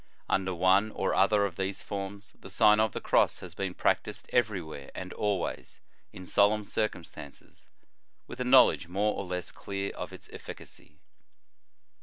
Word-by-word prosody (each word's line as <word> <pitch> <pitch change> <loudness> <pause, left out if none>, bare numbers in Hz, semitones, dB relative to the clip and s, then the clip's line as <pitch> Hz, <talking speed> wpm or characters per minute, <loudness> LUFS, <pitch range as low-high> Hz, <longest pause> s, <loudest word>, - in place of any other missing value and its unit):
Under 95 -1 0
one 95 +4 +4
or 95 - -1
other 100 +1 +4
of 90 -4 -5
these 95 0 -3
forms, 100 +1 -6
the 95 - -11
Sign 105 +2 +5
of 110 -1 +3
the - - -4
Cross - - +2
has - - -9
been 95 -2 -4
practised - - -1
every 110 -5 +2
where 80 -4 -9
and - - -6
always, 100 -4 -2 0.3
in 95 - -10
solemn 105 +3 +3
circumstances, 90 -9 -5 0.6
with 125 - -10
a - - 0
knowledge 125 -8 +5
more 100 +4 0
or 100 - -4
less 90 -1 -4
clear 100 0 -4
of - - -7
its - - -12
efficacy. 75 - -11
100 Hz, 160 wpm, -29 LUFS, 95-105 Hz, 0.6 s, Sign